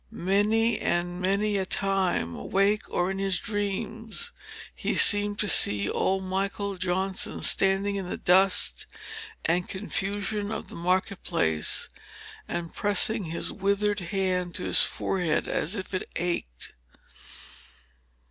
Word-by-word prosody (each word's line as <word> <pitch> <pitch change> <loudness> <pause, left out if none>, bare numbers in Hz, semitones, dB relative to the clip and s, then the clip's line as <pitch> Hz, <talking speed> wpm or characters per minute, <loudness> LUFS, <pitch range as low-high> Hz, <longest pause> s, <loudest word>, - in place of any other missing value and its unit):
Many 210 +4 +1
and 175 +1 -2
many 200 +2 +1
a 190 - -1
time, 190 - 0
awake 200 +2 0
or 180 +2 -1
in 195 - -5
his 195 -2 0
dreams, 215 +2 -4 0.4
he - - -3
seemed 205 0 +6
to 210 - -1
see 100 - +6
old 190 0 0
Michael 195 +1 -3
Johnson, 185 +1 -2
standing 195 +1 +2
in 190 -2 -5
the - - -4
dust 185 - +2 0.6
and 175 +2 0
confusion 205 +1 -3
of 220 - -6
the - - -9
market 185 +2 -1
place, 80 - 0 0.6
and 170 -1 -5
pressing 205 0 +1
his 165 +1 -3
withered 200 +1 0
hand 180 -1 -2
to - - -3
his - - +7
forehead 175 -5 0
as 175 +8 -1
if 195 -1 -7
it 185 - -3
ached. 170 - -3
195 Hz, 130 wpm, -26 LUFS, 180-205 Hz, 0.6 s, his